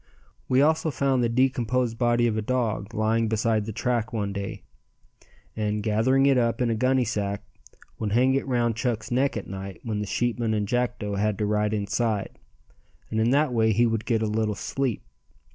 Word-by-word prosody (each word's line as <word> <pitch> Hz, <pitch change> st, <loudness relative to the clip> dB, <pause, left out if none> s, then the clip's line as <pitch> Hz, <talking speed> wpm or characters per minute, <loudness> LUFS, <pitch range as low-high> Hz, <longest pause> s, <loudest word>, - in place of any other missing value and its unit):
We 130 Hz, +2 st, +4 dB
also 160 Hz, +1 st, +2 dB
found 135 Hz, -2 st, +1 dB
the 120 Hz, -, +2 dB
decomposed 125 Hz, -1 st, +1 dB
body 120 Hz, -1 st, +3 dB
of 115 Hz, -2 st, +1 dB
a 110 Hz, -, 0 dB
dog 110 Hz, -3 st, -1 dB
lying 110 Hz, 0 st, +1 dB
beside 110 Hz, -1 st, +1 dB
the 110 Hz, -, -4 dB
track 115 Hz, +1 st, -1 dB
one 100 Hz, -3 st, -2 dB
day, 100 Hz, 0 st, -5 dB, 0.9 s
and 105 Hz, -1 st, -1 dB
gathering 115 Hz, +6 st, +3 dB
it 135 Hz, -2 st, +4 dB
up 115 Hz, -1 st, 0 dB
in 120 Hz, -2 st, +1 dB
a -, -, +1 dB
gunnysack 115 Hz, -5 st, 0 dB, 0.6 s
would 105 Hz, -2 st, -2 dB
hang 130 Hz, +3 st, +4 dB
it 135 Hz, 0 st, -1 dB
round 120 Hz, -3 st, +1 dB
Chuck's 115 Hz, -2 st, -2 dB
neck 130 Hz, 0 st, +1 dB
at 105 Hz, -, -5 dB
night 95 Hz, 0 st, -7 dB
when 110 Hz, -3 st, -2 dB
the 105 Hz, -, -3 dB
sheepmen 120 Hz, 0 st, 0 dB
and 105 Hz, -1 st, -1 dB
Jackdo 120 Hz, -4 st, -1 dB
had 105 Hz, -1 st, 0 dB
to 105 Hz, -, -1 dB
ride 105 Hz, 0 st, +1 dB
inside, 105 Hz, 0 st, -1 dB, 0.7 s
and 110 Hz, -, 0 dB
in 110 Hz, +1 st, +3 dB
that 140 Hz, 0 st, +2 dB
way 110 Hz, -1 st, +3 dB
he 120 Hz, +4 st, +3 dB
would 115 Hz, -2 st, -1 dB
get 115 Hz, -2 st, +1 dB
a -, -, +1 dB
little 105 Hz, 0 st, 0 dB
sleep. 130 Hz, +3 st, -2 dB
115 Hz, 190 wpm, -25 LUFS, 105-125 Hz, 0.9 s, We